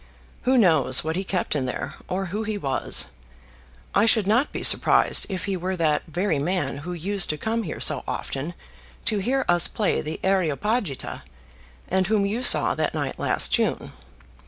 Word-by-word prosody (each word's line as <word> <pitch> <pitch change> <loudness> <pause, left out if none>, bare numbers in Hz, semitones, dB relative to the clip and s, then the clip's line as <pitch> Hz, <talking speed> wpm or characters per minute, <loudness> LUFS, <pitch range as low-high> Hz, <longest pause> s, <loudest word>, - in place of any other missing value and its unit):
Who 260 - +4
knows 160 - +4
what 160 +1 -3
he 190 - -2
kept 185 -4 -2
in 130 -3 -1
here, - - -5
or 190 +1 -3
who 210 - -2
he 215 -1 -3
was! 135 -8 -1 0.9
I 225 - +3
should 220 -3 +4
not 230 +8 +1
be - - -5
surprised - - +5
if 185 -2 -4
he 200 -2 -2
were 185 +1 -3
that 155 -4 +1
very 170 -1 -1
man 150 -3 -2
who 175 +6 -6
used 190 +3 0
to 150 - -2
come 225 +6 -2
here 170 -8 -6
so - - +1
often 150 +6 -5 0.5
to 215 -2 0
hear 265 +7 -1
us 175 -1 +4
play 210 -4 -1
the 155 +1 -6
'Areopagita,' 190 - -1 0.7
and 190 0 0
whom 210 -1 +1
you 215 +5 -2
saw 255 - +5
that - - -2
night - - -4
last - - +2
June. - - -1
185 Hz, 180 wpm, -23 LUFS, 160-210 Hz, 0.9 s, surprised